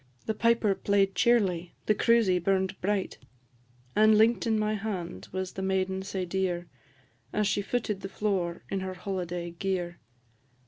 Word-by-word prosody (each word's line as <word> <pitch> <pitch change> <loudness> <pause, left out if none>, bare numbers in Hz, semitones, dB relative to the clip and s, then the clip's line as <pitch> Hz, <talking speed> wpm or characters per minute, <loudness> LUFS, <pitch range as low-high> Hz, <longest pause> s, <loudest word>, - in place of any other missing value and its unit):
The 220 - 0
piper 230 -2 +3
play'd 195 0 +2
cheerly, 185 -7 +2
the 215 - +4
cruisie 215 -4 +3
burn'd 190 +1 +1
bright; 200 0 -1 0.8
And 215 0 +6
link'd 230 +2 +4
in 220 -1 +2
my 215 0 +1
hand 195 - -4
was 185 0 -3
the 190 - -5
maiden 190 0 0
sae 190 -1 -3
dear, 180 -1 -1 0.6
As 210 - +1
she 205 0 +1
footed 210 -2 -2
the 195 - -5
floor 185 -4 -1
in 195 - 0
her 190 0 -4
holiday 180 -2 -4
gear. 175 0 -3
195 Hz, 150 wpm, -28 LUFS, 185-210 Hz, 0.8 s, And